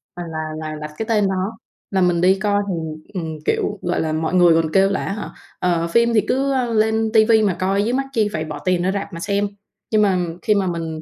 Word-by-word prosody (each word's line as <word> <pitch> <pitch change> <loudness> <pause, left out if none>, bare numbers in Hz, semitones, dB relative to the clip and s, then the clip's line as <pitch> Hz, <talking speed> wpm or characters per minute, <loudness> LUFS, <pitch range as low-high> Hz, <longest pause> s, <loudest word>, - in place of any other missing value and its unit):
à, 175 - -5
là 160 - -4 0.3
là 155 - -5
đặt 150 0 -6
cái 220 - -3
tên 210 -3 +3
đó 190 +4 -2 0.3
là 190 -1 +1
mình 175 -2 +2
đi 190 +2 +4
coi. 205 0 +1
Thì, 185 - -1 0.4
ừm, 160 -4 -4
kiểu, 205 - 0
gọi 175 0 -1
là, 155 -1 -1
mọi 160 +2 -1
người 175 -2 +6
còn 160 -1 -4
kêu 195 0 +4
là 195 - -1
á 195 - -2
hả, 210 - -6 0.3
ờ, 170 -2 +1
phim 235 +7 +3
thì 215 - +4
cứ 275 +1 +1 0.2
lên 220 0 +2
ti 220 -1 +6
vi 220 -1 +4
mà 200 -3 +2
coi 195 +2 +1
chứ 240 - 0
mắc 270 +1 0
chi 215 -3 +2
phải 155 0 -2
bỏ 150 -2 -6
tiền 180 -1 +2
ra 185 - +1
rạp 200 0 -4
mà 165 - -6
xem, 200 +2 0 0.4
nhưng 215 -1 +4
mà 195 -3 +3 0.3
khi 210 - +3
mà 195 -2 +1
mình 165 -2 -4
195 Hz, 255 wpm, -20 LUFS, 170-215 Hz, 0.4 s, người